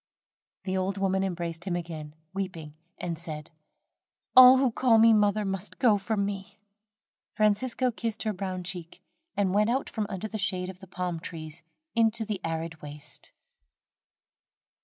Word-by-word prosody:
The 190 -1 -2
old 190 +1 -1
woman 190 0 +1
embraced 170 -2 -3
him 180 -3 -1
again, 160 -3 -6 0.2
weeping, 180 -6 -4 0.2
and 170 -2 -4
said: 155 -2 -7 0.8
"All 255 0 +11
who 260 -2 +3
call 230 0 +4
me 225 0 +7
mother 210 0 +3
must 195 +1 -4
go 225 -6 +4
from 200 0 0
me." 200 0 -5 0.8
Francisco 230 +4 +2
kissed 230 -1 -3
her 215 -1 0
brown 185 -1 -4
cheek, 175 -2 -6 0.3
and 195 -2 +2
went 210 +2 +3
out 265 +3 0
from 215 -2 -2
under 195 +1 -4
the 220 0 -5
shade 185 -1 -1
of 185 - -17
the 190 - -12
palm 180 -2 -3
trees 160 0 -7 0.3
into 225 -1 +2
the 205 -3 -3
arid 165 0 -3
waste. 150 0 -8
190 Hz, 155 wpm, -28 LUFS, 170-215 Hz, 0.8 s, All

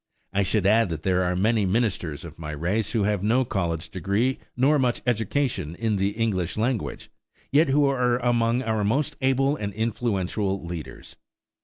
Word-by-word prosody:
I 100 - +2
should 95 +1 +1
add 110 0 +4
that 80 -2 -5
there 95 -1 +2
are 90 0 0
many 110 +3 +2
ministers 95 - -1
of - - -11
my 75 -2 -5
race 95 +8 -1
who 110 -4 +2
have 105 -2 0
no 120 +6 +2
college 85 -5 -2
degree 100 +8 0 0.2
nor 140 +4 +4
much 125 -2 0
education 115 - -1
in 110 0 0
the 100 +1 0
English 100 -7 -1
language, 115 +1 -2 0.4
yet 150 +3 +4
who 145 +2 +4
are 125 -3 +2
among 120 0 +1
our 110 -3 0
most 130 +8 0
able 135 +2 +2
and 105 -7 -4
influential 100 -4 -1
leaders. 85 -3 -8
110 Hz, 170 wpm, -25 LUFS, 95-125 Hz, 0.4 s, add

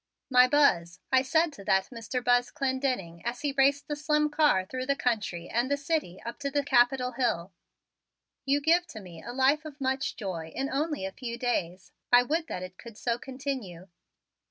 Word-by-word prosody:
"My 250 0 +7
Buzz," 180 -12 +3
I 260 -1 +5
said 315 +4 +2
to 200 - -11
that 190 0 +2
Mr. 240 +1 -4
Buzz 245 0 +3
Clendenning 260 - -2
as 240 +2 -3
he 290 -1 0
raced 280 +1 +2
the 295 - -2
slim 300 +1 +1
car 295 -11 +3
through 255 +5 -5
the 280 - +2
country 215 -10 -2
and 240 +3 0
the 285 - +1
city 280 - -2
up 235 - -6
to 280 -1 -2
the 285 +1 0
Capitol 250 -1 +3
hill, 200 -8 -1 0.9
"you 280 +1 +1
give 340 +4 +3
to 235 -10 -9
me 175 -5 -11
a 240 - -7
life 270 +4 +2
of 300 -2 -10
much 265 0 -1
joy 185 -7 -5
in 270 +1 -2
only 295 -5 -1
a 190 - -4
few 235 +2 -6
days. 185 -7 -2 0.2
I 245 0 +7
would 320 +5 -1
that 180 - -5
it 185 0 -10
could 230 -3 -11
so 235 0 -1
continue." 255 -10 -6
255 Hz, 195 wpm, -28 LUFS, 210-280 Hz, 0.9 s, My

